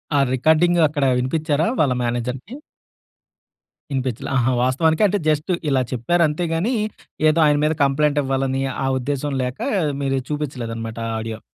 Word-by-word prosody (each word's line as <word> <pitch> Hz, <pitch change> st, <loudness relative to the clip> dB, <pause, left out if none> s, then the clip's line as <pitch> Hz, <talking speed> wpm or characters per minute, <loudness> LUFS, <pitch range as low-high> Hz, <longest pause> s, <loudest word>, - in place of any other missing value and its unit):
ఆ -, -, +4 dB
రికార్డింగ్ 160 Hz, +6 st, +3 dB
అక్కడా 145 Hz, -2 st, 0 dB
వినిపిచ్చారా 150 Hz, +4 st, 0 dB
వాళ్ళ 135 Hz, -4 st, +3 dB
మేనేజర్‌కి? 125 Hz, -, -3 dB, 1.3 s
వినిపిచ్చలా. 130 Hz, -3 st, -3 dB
ఆహా! 125 Hz, +1 st, +2 dB
వాస్తవానికి 160 Hz, +8 st, +2 dB
అంటే, 205 Hz, +1 st, 0 dB
జస్ట్ 155 Hz, +3 st, 0 dB, 0.2 s
ఇలా 135 Hz, -2 st, +2 dB
చెప్పారంతే 155 Hz, +6 st, +1 dB
గానీ, 200 Hz, +10 st, 0 dB, 0.5 s
ఏదో 155 Hz, +2 st, +2 dB
ఆయన 150 Hz, -1 st, +4 dB
మీద 155 Hz, -, +2 dB
కంప్లెయింటివ్వాలనీ, 135 Hz, -2 st, 0 dB, 0.2 s
ఆ -, -, 0 dB
ఉద్దేశం 145 Hz, +2 st, -2 dB
లేకా 125 Hz, +1 st, -3 dB, 0.3 s
మీరిది 135 Hz, -1 st, -1 dB
చూపిచ్చలేదనమాట 115 Hz, -7 st, -4 dB
ఆ -, -, -2 dB
ఆడియో. 110 Hz, -1 st, -5 dB
140 Hz, 130 wpm, -21 LUFS, 125-155 Hz, 1.3 s, ఆ